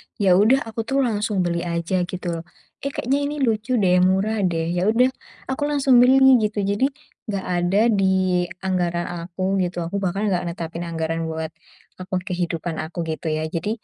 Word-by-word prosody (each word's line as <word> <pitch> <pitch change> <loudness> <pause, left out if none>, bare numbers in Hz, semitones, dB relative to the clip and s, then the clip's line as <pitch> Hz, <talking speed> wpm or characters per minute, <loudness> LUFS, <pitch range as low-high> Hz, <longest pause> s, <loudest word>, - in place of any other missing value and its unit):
ya 195 -3 +2
udah 260 +7 +4
aku 225 0 -8
tuh 275 0 +2
langsung 210 -4 0
beli 170 -1 -1
aja, 175 +1 -1
gitu 175 -2 -4
loh, - - -9 0.4
"Eh 280 - -4
kayaknya 275 0 -1
ini 295 - -4
lucu 225 +1 0
deh, 180 -4 +3
murah 190 +4 +2
deh." 165 -1 -1
Ya 180 +2 0
udah 245 +4 +4 0.4
aku 290 +2 -1
langsung 270 -4 +4
beli, 265 0 +6
gitu. 210 -1 -1
Jadi 205 +7 +1 0.4
nggak 200 -3 -3
ada 185 +4 +2
di 190 -3 +2 0.2
anggaran 175 -2 -1 0.2
aku 185 +2 -1
gitu, 175 -2 -1
aku 200 +4 -3
bahkan 195 +2 -1
nggak 175 -1 -1
netapin 170 0 -5
anggaran 165 0 -2
buat 160 0 -4 0.5
akun 185 0 -3
kehidupan 175 -3 -3
aku, 170 +2 -4
gitu 160 +1 -5
ya. 155 0 -1
Jadi 215 +6 -3
185 Hz, 180 wpm, -22 LUFS, 175-220 Hz, 0.5 s, beli